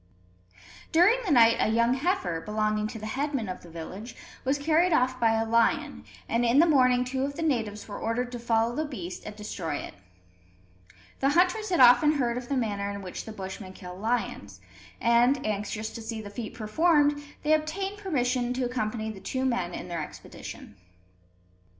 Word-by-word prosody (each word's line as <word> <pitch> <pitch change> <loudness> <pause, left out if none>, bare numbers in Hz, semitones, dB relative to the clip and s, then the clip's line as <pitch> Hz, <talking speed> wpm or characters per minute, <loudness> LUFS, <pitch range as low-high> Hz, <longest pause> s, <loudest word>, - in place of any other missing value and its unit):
During 365 +9 +5
the 365 - 0
night 230 -4 +6
a - - +2
young 235 +2 +3
heifer, 310 - -1
belonging 215 +1 -1
to 225 - -7
the 215 - -7
headman 270 0 -2
of 185 - -6
the 175 - -13
village, 190 +8 -8 0.3
was 270 +2 +1
carried 320 +5 +2
off 255 -2 +2
by 225 -2 +3
a 225 0 +1
lion; 230 0 +1 0.2
and 235 +1 +1
in 240 +2 +3
the 325 - +7
morning 255 -5 +4
two 260 +1 -2
of 280 +1 -3
the 330 - -3
natives 225 -9 -1
were 205 - -6
ordered 245 +2 -2
to 245 - -5
follow 230 0 +1
the 310 - 0
beast 190 - -6
and 210 - -7
destroy 185 -7 -4
it. - - -6 1.3
The 275 - +3
hunters 365 +7 +2
had 350 -6 +2
often 250 +5 +7
heard 245 -5 0
of 245 0 -6
the 280 - 0
manner 205 -4 -1
in 200 0 -6
which 180 - -6
the 220 - -7
Bushmen 190 -1 -7
kill 180 -1 -9
lions; 195 - -3 0.4
and, 240 +4 +3
anxious 215 +1 -3
to 230 - -8
see 225 0 -5
the 205 -2 -8
feat 215 +1 -6
performed, 290 +6 +2 0.2
they 305 +1 +3
obtained 385 +7 -1
permission 250 -9 0
to 255 0 -1
accompany 220 -2 -2
the 200 - -10
two 260 +7 -3
men 210 -9 -1
on - - -6
their 170 -2 -3
expedition. 105 - -10
240 Hz, 185 wpm, -27 LUFS, 215-280 Hz, 1.3 s, the